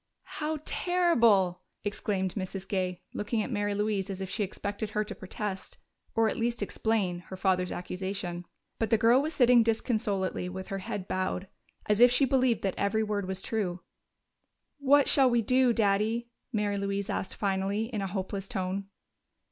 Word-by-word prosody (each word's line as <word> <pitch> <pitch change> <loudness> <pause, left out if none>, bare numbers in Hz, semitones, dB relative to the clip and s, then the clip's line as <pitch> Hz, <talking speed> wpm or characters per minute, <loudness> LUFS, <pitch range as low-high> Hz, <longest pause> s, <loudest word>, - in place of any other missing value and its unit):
"How 310 +1 0
terrible!" 235 - +3 0.2
exclaimed 195 -2 -1
Mrs. 190 -1 -5
Gay, 185 -2 -2
looking 215 +1 -1
at 265 - -5
Mary 205 -2 0
Louise 205 -1 0
as 195 -1 -3
if 190 -1 -5
she - - -2
expected 205 +2 -4
her 210 0 0
to 210 - -7
protest, 190 0 -5 0.4
or 225 0 +4
at - - -1
least 235 -1 0
explain, 205 -4 0
her 190 - -7
father's 185 -1 +1
accusation. 180 -1 -4 0.3
But 225 - 0
the 225 - +4
girl 235 +4 +5
was 310 +2 -3
sitting 245 -2 +6
disconsolately 215 -5 0
with 190 +1 -7
her 195 - -3
head 200 -1 -5
bowed, 185 0 -2 0.4
as 210 0 +2
if 245 +1 +9
she 250 +3 +4
believed 255 -3 +2
that 195 - +1
every 210 +2 +1
word 205 -3 -2
was 190 0 -2
true. 185 -5 -2 1.0
"What 285 0 +5
shall 270 -2 +6
we 240 -1 +2
do, 255 +2 +4
Daddy?" 225 +2 +1 0.2
Mary 210 -3 0
Louise 200 +1 -2
asked 190 - -3
finally, 195 +1 0
in 210 - -1
a 195 - -1
hopeless 195 +1 -4
tone. 195 -3 -3
205 Hz, 170 wpm, -29 LUFS, 190-230 Hz, 1.0 s, if